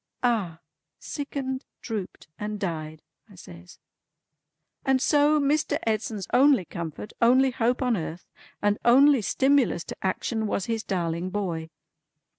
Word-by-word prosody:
"Ah! 200 Hz, -10 st, 0 dB, 0.4 s
Sickened, 275 Hz, -3 st, -4 dB, 0.2 s
drooped, 215 Hz, -6 st, -5 dB
and 210 Hz, 0 st, -4 dB
died!" 160 Hz, -5 st, -4 dB, 0.3 s
I 200 Hz, -, -16 dB
says. 85 Hz, -, -13 dB, 1.1 s
"And 265 Hz, -1 st, +2 dB
so 295 Hz, +2 st, +3 dB
Mr. 290 Hz, +1 st, +1 dB
Edson's 215 Hz, -2 st, -1 dB
only 265 Hz, -5 st, +5 dB
comfort, 170 Hz, +5 st, -7 dB
only 255 Hz, +3 st, +5 dB
hope 245 Hz, +2 st, 0 dB
on 250 Hz, -2 st, +2 dB
earth, 170 Hz, -1 st, -5 dB, 0.4 s
and 205 Hz, 0 st, +2 dB
only 270 Hz, +2 st, +6 dB
stimulus 265 Hz, -5 st, +2 dB
to -, -, -8 dB
action, 220 Hz, +4 st, -1 dB
was 200 Hz, -, -1 dB
his 225 Hz, -1 st, -2 dB
darling 175 Hz, -3 st, -2 dB
boy. 175 Hz, -5 st, -3 dB
220 Hz, 125 wpm, -26 LUFS, 180-260 Hz, 1.1 s, only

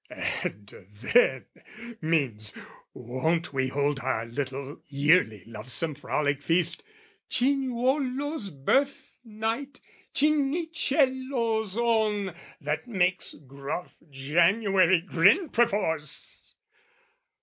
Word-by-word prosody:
And 100 Hz, +2 st, -4 dB, 0.5 s
"then" 135 Hz, -, +4 dB, 0.6 s
means, 135 Hz, -10 st, 0 dB, 0.3 s
won't 145 Hz, +8 st, -2 dB
we 130 Hz, -1 st, +1 dB
hold 140 Hz, +1 st, 0 dB
Our 125 Hz, -4 st, -1 dB
little 135 Hz, +3 st, -5 dB
yearly 140 Hz, -, +2 dB
lovesome 125 Hz, +8 st, -3 dB
frolic 145 Hz, 0 st, -1 dB
feast, 170 Hz, +2 st, +1 dB, 0.5 s
Cinuolo's 265 Hz, 0 st, 0 dB
birth 265 Hz, -, 0 dB
night, 225 Hz, +5 st, -4 dB, 0.4 s
Cinicello's 270 Hz, -, +1 dB
own, 215 Hz, -5 st, +1 dB, 0.3 s
That 150 Hz, -, -3 dB
makes 185 Hz, -5 st, 0 dB
gruff 140 Hz, +5 st, -7 dB
January 175 Hz, +6 st, +3 dB
grin 195 Hz, -, +4 dB
perforce! 200 Hz, -10 st, -1 dB
180 Hz, 80 wpm, -27 LUFS, -, 0.6 s, then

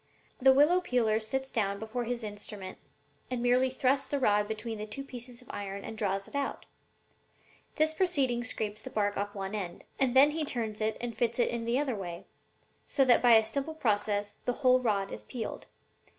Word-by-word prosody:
The 265 Hz, +1 st, +7 dB
willow 300 Hz, +7 st, +5 dB
peeler 230 Hz, -8 st, +2 dB
sits 265 Hz, +5 st, -3 dB
down 200 Hz, -4 st, 0 dB
before 220 Hz, +3 st, -4 dB
his 240 Hz, 0 st, -3 dB
instrument 205 Hz, -2 st, -7 dB, 0.5 s
and 250 Hz, -1 st, -2 dB
merely 250 Hz, +2 st, +3 dB
thrusts 265 Hz, +1 st, +1 dB
the 285 Hz, -, -1 dB
rod 210 Hz, -5 st, +3 dB
between 220 Hz, 0 st, -4 dB
the 215 Hz, -, -5 dB
two 245 Hz, +6 st, -5 dB
pieces 250 Hz, -2 st, -6 dB
of 245 Hz, -, -21 dB
iron 200 Hz, -1 st, -5 dB
and 225 Hz, -, -6 dB
draws 195 Hz, -2 st, -1 dB
it -, -, -16 dB
out 280 Hz, -1 st, -2 dB
again. -, -, -35 dB, 1.1 s
This 315 Hz, +1 st, +2 dB
proceeding 280 Hz, -9 st, +1 dB
scrapes 215 Hz, -3 st, -3 dB
the -, -, -7 dB
bark 205 Hz, -1 st, 0 dB
off 205 Hz, +1 st, -3 dB
one 195 Hz, 0 st, -4 dB
end, 185 Hz, -5 st, -4 dB, 0.2 s
and 265 Hz, -2 st, +2 dB
then 280 Hz, +3 st, +7 dB
he 315 Hz, +1 st, -1 dB
turns 225 Hz, -6 st, -3 dB
it 215 Hz, 0 st, 0 dB
and 235 Hz, -1 st, -4 dB
fits 235 Hz, -1 st, 0 dB
it 240 Hz, -, +3 dB
in 235 Hz, -1 st, -3 dB
the 235 Hz, +2 st, +1 dB
other 275 Hz, -4 st, 0 dB
way; 175 Hz, -4 st, -6 dB, 0.6 s
so 270 Hz, -, +3 dB
that 245 Hz, -2 st, +5 dB
by 240 Hz, -1 st, +7 dB
a 220 Hz, -1 st, +6 dB
simple 280 Hz, +7 st, -3 dB
process 205 Hz, -5 st, 0 dB
the 245 Hz, -, +1 dB
whole 255 Hz, 0 st, +7 dB
rod 205 Hz, -5 st, 0 dB
is -, -, -7 dB
peeled. 235 Hz, -4 st, -6 dB
235 Hz, 205 wpm, -30 LUFS, 210-260 Hz, 1.1 s, The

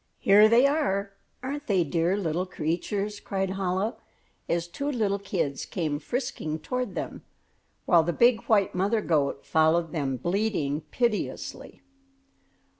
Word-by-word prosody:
"Here 210 Hz, +2 st, +6 dB
they 235 Hz, +4 st, +6 dB
are, 205 Hz, -10 st, +1 dB, 0.3 s
aren't 290 Hz, +3 st, -4 dB
they 190 Hz, -4 st, +3 dB
dear 165 Hz, +5 st, 0 dB
little 180 Hz, -1 st, -1 dB
creatures?" 195 Hz, +5 st, -2 dB
cried 195 Hz, -1 st, -2 dB
Chola, 190 Hz, +3 st, -1 dB, 0.5 s
as 170 Hz, 0 st, 0 dB
two 280 Hz, +12 st, -4 dB
little 210 Hz, -6 st, 0 dB
kids 180 Hz, -8 st, -2 dB
came 155 Hz, -6 st, -2 dB
frisking 240 Hz, -, -3 dB
toward 250 Hz, +1 st, -3 dB
them, -, -, -5 dB, 0.6 s
while 170 Hz, -3 st, +5 dB
the 170 Hz, +2 st, -1 dB
big 235 Hz, +5 st, +4 dB
white 205 Hz, -3 st, +3 dB
mother 200 Hz, +5 st, +1 dB
goat 145 Hz, -6 st, 0 dB
followed 160 Hz, +1 st, +2 dB
them 140 Hz, -5 st, -2 dB
bleating 175 Hz, -, -1 dB
piteously. 235 Hz, +3 st, -3 dB
190 Hz, 130 wpm, -27 LUFS, 165-220 Hz, 0.6 s, Here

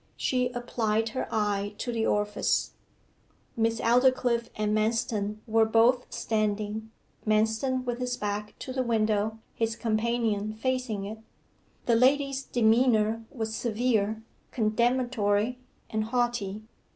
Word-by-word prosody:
She 250 Hz, -1 st, +1 dB
applied 225 Hz, -2 st, 0 dB
her 255 Hz, -, -3 dB
eye 205 Hz, -1 st, 0 dB
to 245 Hz, -, -3 dB
the 225 Hz, -1 st, 0 dB
orifice. 210 Hz, 0 st, +1 dB, 0.8 s
Miss 225 Hz, 0 st, +1 dB
Aldclyffe 245 Hz, -1 st, +3 dB
and 210 Hz, 0 st, 0 dB
Manston 215 Hz, -1 st, 0 dB
were 225 Hz, -1 st, +3 dB
both 230 Hz, +3 st, +3 dB
standing; 215 Hz, 0 st, -1 dB, 0.3 s
Manston 220 Hz, +5 st, +1 dB
with 245 Hz, 0 st, -2 dB
his 250 Hz, 0 st, -2 dB
back 210 Hz, 0 st, -4 dB
to 260 Hz, -, -6 dB
the 260 Hz, -, 0 dB
window, 220 Hz, -2 st, +1 dB, 0.2 s
his 225 Hz, 0 st, -1 dB
companion 220 Hz, -2 st, 0 dB
facing 225 Hz, -3 st, -2 dB
it. 215 Hz, +2 st, -6 dB, 0.7 s
The 235 Hz, -, +3 dB
lady's 275 Hz, +2 st, +3 dB
demeanour 225 Hz, -2 st, +2 dB
was 220 Hz, -3 st, -4 dB
severe, 220 Hz, -2 st, 0 dB, 0.3 s
condemnatory, 235 Hz, 0 st, +1 dB, 0.3 s
and 215 Hz, 0 st, 0 dB
haughty. 230 Hz, -4 st, -1 dB
225 Hz, 115 wpm, -28 LUFS, 215-245 Hz, 0.8 s, Aldclyffe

